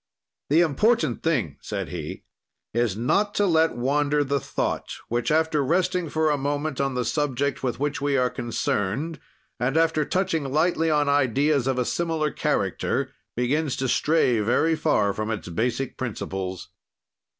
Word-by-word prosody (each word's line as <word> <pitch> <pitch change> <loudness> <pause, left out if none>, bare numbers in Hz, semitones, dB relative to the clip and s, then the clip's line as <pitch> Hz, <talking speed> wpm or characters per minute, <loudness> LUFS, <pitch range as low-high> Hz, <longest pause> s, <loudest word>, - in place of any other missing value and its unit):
"The 155 +4 +5
important 160 - +2
thing," 130 - 0
said - - -4
he, - - -6 0.5
"is 115 -4 0
not 205 - +1
to 205 - +3
let 160 -6 +3
wander 145 +3 +1
the 140 0 0
thought, - - -2 0.2
which, 120 +4 0
after 155 -1 +2
resting 175 +3 +1
for 155 0 +1
a 145 - 0
moment 145 0 -2
on 135 -1 -1
the 125 -1 -1
subject 140 -2 -1
with 125 -2 -2
which 145 +2 -1
we 140 -1 +1
are 125 -1 +2
concerned 120 - -2 0.4
and 135 +5 0
after 160 -1 +3
touching 165 -5 -1
lightly 160 +2 +2
on 150 -2 +2
ideas 140 0 +2
of 130 -1 0
a 125 - +1
similar 160 -2 -1
character, 135 +1 -1 0.2
begins 135 +4 0
to 130 - -1
stray 130 -3 +2
very 120 +10 +2
far 105 -11 +2
from 110 +2 -3
its 110 -5 -4
basic 120 +8 -2
principles. 95 -6 -4
140 Hz, 155 wpm, -25 LUFS, 125-160 Hz, 0.5 s, The